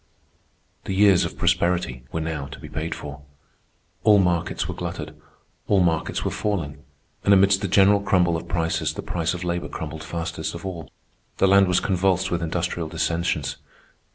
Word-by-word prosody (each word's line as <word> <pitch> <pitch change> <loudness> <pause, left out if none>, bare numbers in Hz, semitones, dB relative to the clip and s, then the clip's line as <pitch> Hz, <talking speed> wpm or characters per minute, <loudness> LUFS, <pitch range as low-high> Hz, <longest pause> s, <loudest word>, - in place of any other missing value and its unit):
The 95 - -2
years 100 -2 +5
of - - -6
prosperity 85 -9 0
were 80 - -2
now 80 -3 -3
to 70 - -10
be - - -9
paid 80 +1 -4
for. 70 -1 -8 0.8
All 105 -1 +6
markets 90 -2 +1
were - - -3
glutted; - - -6 0.5
all 100 - +4
markets 80 -2 0
were - - 0
falling; 80 -9 -2 0.4
and 100 - +6
amidst 95 0 +4
the 100 - -1
general 100 +2 +5
crumble 90 -4 +2
of 80 +1 -5
prices 85 -1 -1
the - - -5
price 90 +1 -1
of 90 - -6
labor 85 0 -2
crumbled 80 -2 -6
fastest 85 -2 -4
of 85 - -8
all. 85 -5 -6 0.5
The 95 - +4
land 100 0 +6
was 90 0 +3
convulsed 95 -1 +1
with 85 -1 0
industrial 85 0 -2
dissensions. 85 +1 -1
85 Hz, 170 wpm, -24 LUFS, 80-95 Hz, 0.8 s, All